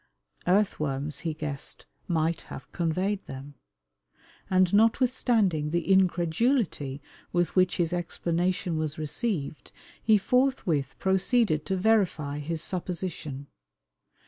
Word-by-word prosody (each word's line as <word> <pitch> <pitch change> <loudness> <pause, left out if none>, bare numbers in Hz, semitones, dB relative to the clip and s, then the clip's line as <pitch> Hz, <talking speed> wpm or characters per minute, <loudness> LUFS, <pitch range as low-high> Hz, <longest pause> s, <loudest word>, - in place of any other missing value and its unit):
Earthworms, 155 -7 +1
he 160 -3 -3
guessed, 150 -3 -6 0.2
might 165 -1 0
have 135 - -9
conveyed 185 +4 -1
them. 135 +2 -8 1.0
And 185 -1 +3
notwithstanding 220 - +3
the 170 +1 -1
incredulity 175 - +1 0.3
with 175 -1 0
which 185 -1 +3
his 170 -1 0
explanation 175 0 -1
was 155 -1 -3
received, 155 - -3 0.3
he 220 -1 +5
forthwith 195 - +1
proceeded 190 - +2
to 190 - 0
verify 180 -8 +1
his 160 +2 -2
supposition. 170 -6 -4
175 Hz, 100 wpm, -27 LUFS, 155-195 Hz, 1.0 s, he